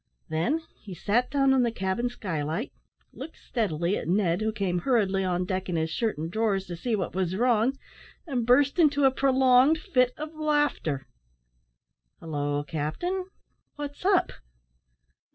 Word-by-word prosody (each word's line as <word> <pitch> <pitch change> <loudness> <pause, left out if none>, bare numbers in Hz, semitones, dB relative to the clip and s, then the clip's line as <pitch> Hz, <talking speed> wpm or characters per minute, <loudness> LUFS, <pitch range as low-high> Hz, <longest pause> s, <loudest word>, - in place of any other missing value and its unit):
Then 230 - 0 0.2
he 195 -4 -9
sat 220 +8 0
down 275 -1 +3
on 265 - +4
the 240 - +2
cabin 195 +4 -1
skylight, 175 - -4 0.4
looked 295 +5 -9
steadily 190 -5 -1
at - - -5
Ned, 180 0 +1
who 220 0 0
came 195 -4 -1
hurriedly 195 -4 +1
on 180 -1 0
deck 185 0 -3
in 175 - -1
his 160 0 -1
shirt 225 +2 -1
and 160 +2 -4
drawers 205 -2 0
to 175 - -6
see 225 +7 -1
what 185 -4 -3
was 185 -1 -1
wrong, 240 +3 +2 0.5
and 260 -7 -1
burst 280 +7 +3
into 290 -3 +4
a 265 - +6
prolonged 265 +2 +4
fit 250 -5 +1
of 305 +1 -6
laughter. 295 - 0 1.1
"Hallo, 145 -2 -2
captain! 255 - -3 0.5
what's 290 +1 -7
up!" 380 -1 +3
220 Hz, 155 wpm, -27 LUFS, 180-270 Hz, 1.1 s, a